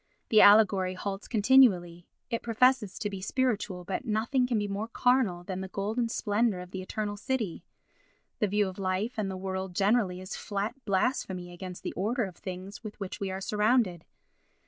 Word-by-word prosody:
The 215 - +6
allegory 200 -3 +6
halts 195 +1 -5
continually; 200 -8 +4 0.2
it 230 - -1
professes 235 -2 +2
to 215 - -2
be 195 -2 -6
spiritual, 210 -5 -1
but 185 +6 -3
nothing 240 +3 +1
can 240 -3 0
be 205 -1 -1
more 200 +2 -3
carnal 230 -7 +1
than 185 +1 -5
the 190 - -5
golden 215 +5 -2
splendour 210 -2 0
of 180 0 -9
the 190 - -5
eternal 205 +2 -3
city; 225 -5 -3 0.8
the 210 - +2
view 205 +1 +1
of 190 +1 -8
life 190 +5 -1
and 200 -2 -1
the 190 - -4
world 190 -1 -4
generally 200 -2 +2
is 185 0 -6
flat 205 +2 -3
blasphemy 190 -4 -1
against 180 0 -8
the - - -4
order 225 +6 0
of 190 -4 -6
things 190 +4 -8
with 215 -1 -8
which 195 -2 -5
we 195 - -2
are 190 0 -4
surrounded. 210 -4 +1
200 Hz, 180 wpm, -29 LUFS, 185-225 Hz, 0.8 s, The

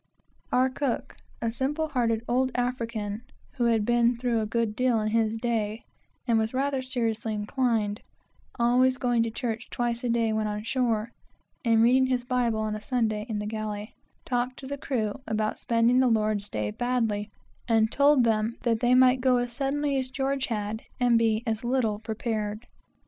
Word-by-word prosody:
Our 255 +1 +3
cook, 265 -2 -3 0.3
a 230 - 0
simple 295 +6 -1
hearted 230 -5 0
old 255 +2 +2
African, 230 -4 -2 0.3
who 255 -4 -1
had 225 -3 +2
been 240 0 +3
through 235 -1 0
a 215 - -2
good 230 -1 -1
deal 250 -2 +2
in 215 0 -1
his 225 0 +1
day, 225 -2 -2 0.4
and 230 -2 +3
was 220 +3 -1
rather 270 0 0
seriously 225 -4 -2
inclined, 210 -1 0 0.6
always 250 +2 +3
going 245 -2 +1
to 230 - 0
church 230 0 -4
twice 240 0 -2
a 245 - -1
day 230 -1 +1
when 215 0 0
on 210 0 -3
shore, 235 -2 0 0.5
and 230 -2 +4
reading 260 +2 +4
his 250 -1 0
Bible 245 -3 0
on 215 0 -2
a 215 - -6
Sunday 220 -3 -1
in 220 - -2
the 210 - -3
galley, 215 0 -4 0.3
talked 250 0 -1
to 270 - -9
the 280 +2 -4
crew 230 -3 -2
about 215 0 -1
spending 235 +2 +3
their 260 -1 +4 0.3
Sabbaths 105 - -4
badly, 225 -4 0 0.4
and 225 -1 +3
told 280 -2 +5
them 225 0 +1
that 230 -2 +1
they 245 +1 +3
might 255 0 +5
go 255 -1 +4
as 245 0 -1
suddenly 280 +2 0
as 260 -1 -2
George 270 0 -1
had, 215 -1 -3 0.2
and 240 -2 +4
be 225 0 +1
as 225 -1 -2
little 240 -4 0
prepared. 220 0 -3
235 Hz, 175 wpm, -27 LUFS, 220-255 Hz, 0.6 s, told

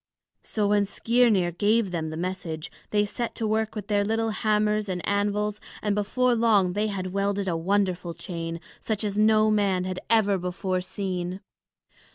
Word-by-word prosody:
So 210 -2 -1
when 205 -1 +3
Skirnir 220 -4 +2
gave 205 +3 +2
them 160 -2 -2
the 155 - -5
message, 170 -3 -4 0.2
they 210 0 +2
set 235 +3 -4
to 225 - -2
work 220 +1 0
with 210 -2 -4
their 205 -1 +1
little 225 +2 0
hammers 210 -1 +1
and 180 -1 -3
anvils, 205 +1 0 0.2
and 210 -1 0
before 245 +5 +1
long 215 -6 +3
they 210 +2 0
had 185 -3 -4
welded 200 0 0
a 175 - 0
wonderful 180 -1 0
chain, 165 -3 -5 0.2
such 220 -1 -2
as 205 -2 -2
no 215 0 +4
man 200 -3 +2
had 185 0 -3
ever 205 -4 +3
before 185 +1 -2
seen. 185 -1 -4
205 Hz, 170 wpm, -26 LUFS, 185-215 Hz, 0.2 s, no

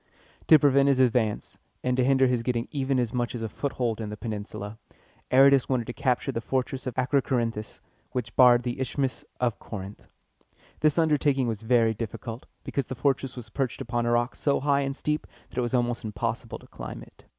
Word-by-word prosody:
To 155 - +9
prevent 140 -2 +4
his 135 -2 +3
advance, 120 -4 +1 0.2
and 125 0 +1
to 130 - +2
hinder 135 0 +4
his 125 -2 +1
getting 120 -1 -1
even 135 -2 0
as 120 -3 0
much 120 -1 -1
as 115 - -4
a - - -1
foothold 120 -1 -2
in 105 - -4
the 105 - -6
peninsula, 105 -1 -6 0.5
Aratus 135 0 +6
wanted 125 -3 +1
to 120 - -5
capture 135 0 0
the 115 - -3
fortress 130 +1 -2
of 125 - -5
Ac 130 0 0
ro 140 -2 +4
co 130 - -1
rin´thus, 115 -3 -3 0.3
which 120 -3 -4
barred 125 -1 +7
the 125 +2 -3
Isthmus 130 0 -2 0.2
of 120 -3 0
Corinth. 100 -1 -8 0.7
This 155 0 +2
undertaking 145 -5 +2
was 110 -2 -3
very 115 -1 +3
difficult, 115 +2 -6 0.2
because 140 -3 -2
the 130 - -5
fortress 135 0 0
was 120 -4 -8
perched 130 -1 -2
upon 120 0 -1
a - - +2
rock 120 +1 +1
so 140 -1 +1
high 140 0 +2
and 135 0 -2
steep 150 +1 -2 0.2
that - - -3
it - - +2
was 120 +1 -1
almost 120 0 0
impossible 110 +2 -3
to - - -17
climb - - -8
it. - - -19
125 Hz, 205 wpm, -27 LUFS, 115-135 Hz, 0.7 s, To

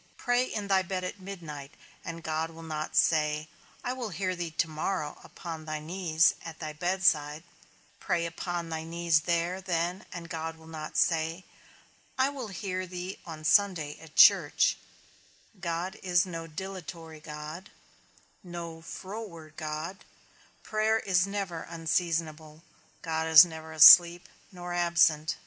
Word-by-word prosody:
Pray 245 0 +1
in 210 -5 -4
thy 195 -1 +3
bed 185 0 -4
at 185 +2 -5
midnight, 165 -8 -8 0.3
and 165 0 -7
God 160 0 -2
will 165 0 -12
not 155 -1 -5
say, 150 -1 +2 0.4
I 250 - -2
will 250 -4 -5
hear 185 +1 -2
thee 175 -1 -4
to 160 +1 -1
morrow 155 0 -3
upon 160 -2 -8
thy 155 -1 -3
knees, 165 0 +2
at 165 -1 -8
thy 155 -2 -6
bedside; 160 -3 +1 0.6
pray 170 -1 -1
upon 170 0 -4
thy 160 -1 -4
knees 165 -1 +1
there 170 +3 -1
then, 175 0 -2
and 170 -1 -7
God 165 -1 -5
will 160 - -17
not 155 -1 -7
say, 165 +2 +1 0.7
I 260 +1 +3
will 270 -5 -6
hear 185 -1 -4
thee 180 +1 -6
on 155 -2 -8
Sunday 165 -4 +2
at 160 -1 -15
church; - - +6 0.8
God 175 +1 -3
is 180 0 +2
no 165 -2 -6
dilatory 170 -2 -8
God, 155 +4 -8 0.7
no 170 -2 -7
froward 175 -3 -8
God; 155 +5 -5 0.6
prayer 215 +1 +1
is 190 -4 +1
never 195 -5 -4
unseasonable, 160 -2 -2 0.4
God 160 0 -1
is 160 +1 +10
never 160 -1 -9
asleep, 170 +2 +9 0.2
nor 175 -1 -7
absent. 170 -3 +2
170 Hz, 140 wpm, -29 LUFS, 160-185 Hz, 0.8 s, is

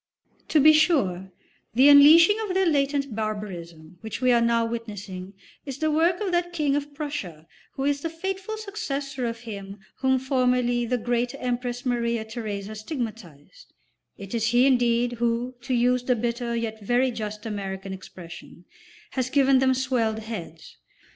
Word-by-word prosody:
To 310 - +3
be 310 +2 +7
sure, 200 - +2 0.4
the 260 +4 +6
unleashing 315 +7 +8
of 400 -4 -3
their 380 0 +3
latent 280 -5 0
barbarism 180 -6 -6
which 220 -1 -6
we 255 -1 +3
are 235 -1 +4
now 230 0 +2
witnessing 205 -5 -6 0.3
is 275 -2 -6
the 315 +1 0
work 335 +3 +2
of 395 -3 -1
that 350 0 0
King 295 -4 +1
of 290 0 -4
Prussia 245 - -5 0.3
who 270 - -4
is 285 0 0
the 330 - -3
faithful 385 +6 -4
successor 285 - -4
of 230 0 -5
him 200 -4 -8 0.2
whom 265 0 +2
formerly 250 -2 +1
the 250 +1 0
great 240 +2 -1
Empress 245 0 -3
Maria 235 -2 -1
Theresa 215 -3 -5
stigmatised; 220 - -7 0.4
it 195 +1 -9
is 225 -2 0
he 240 +2 +4
indeed, 245 -2 +2
who, 240 +1 0
to 255 +1 -1
use 250 +1 +2
the 250 0 +1
bitter 235 +1 -2
yet 220 -2 -4
very 245 +4 +2
just 215 -2 -6
American 195 -2 -5
expression, 175 -2 -11 0.5
has 255 -1 -2
given 270 -1 +4
them 260 0 +3
swelled 250 -4 0
heads. 205 -8 -8
245 Hz, 160 wpm, -25 LUFS, 215-280 Hz, 0.5 s, unleashing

